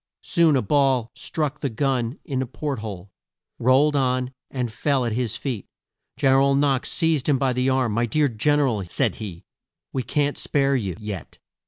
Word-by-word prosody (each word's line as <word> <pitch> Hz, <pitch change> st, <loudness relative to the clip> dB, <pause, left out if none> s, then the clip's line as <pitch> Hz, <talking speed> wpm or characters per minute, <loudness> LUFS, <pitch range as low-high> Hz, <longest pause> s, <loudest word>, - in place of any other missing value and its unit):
Soon 165 Hz, -4 st, +3 dB
a 130 Hz, -, +2 dB
ball 130 Hz, -2 st, +2 dB
struck 150 Hz, -2 st, -3 dB
the 140 Hz, -, -1 dB
gun 125 Hz, +1 st, -1 dB
in 135 Hz, -6 st, -2 dB
the 130 Hz, -, -1 dB
port 140 Hz, 0 st, -4 dB
hole, 100 Hz, -3 st, -7 dB, 0.5 s
rolled 135 Hz, +5 st, +4 dB
on, 130 Hz, -1 st, 0 dB, 0.2 s
and 125 Hz, -4 st, -3 dB
fell 135 Hz, 0 st, +1 dB
at 115 Hz, -, -1 dB
his 115 Hz, -1 st, -1 dB
feet. 125 Hz, -8 st, -4 dB, 0.5 s
Gen 135 Hz, -1 st, +3 dB
er 135 Hz, -, +5 dB
al 140 Hz, 0 st, +3 dB
Knox 140 Hz, -2 st, +1 dB
seized 160 Hz, -5 st, +1 dB
him 140 Hz, -, +4 dB
by 130 Hz, -1 st, +1 dB
the 125 Hz, +1 st, +1 dB
arm. 130 Hz, -3 st, +1 dB
"My 120 Hz, +3 st, +1 dB
dear 150 Hz, +5 st, +2 dB
Gen 145 Hz, +5 st, +1 dB
er 140 Hz, -, +3 dB
al," 110 Hz, -6 st, -1 dB
said -, -, 0 dB
he, 95 Hz, -6 st, -7 dB, 0.5 s
"we 130 Hz, -, 0 dB
can't 145 Hz, +4 st, -1 dB
spare 140 Hz, -1 st, +1 dB
you 100 Hz, -9 st, -2 dB
yet." 105 Hz, -7 st, -7 dB
130 Hz, 195 wpm, -23 LUFS, 115-140 Hz, 0.5 s, er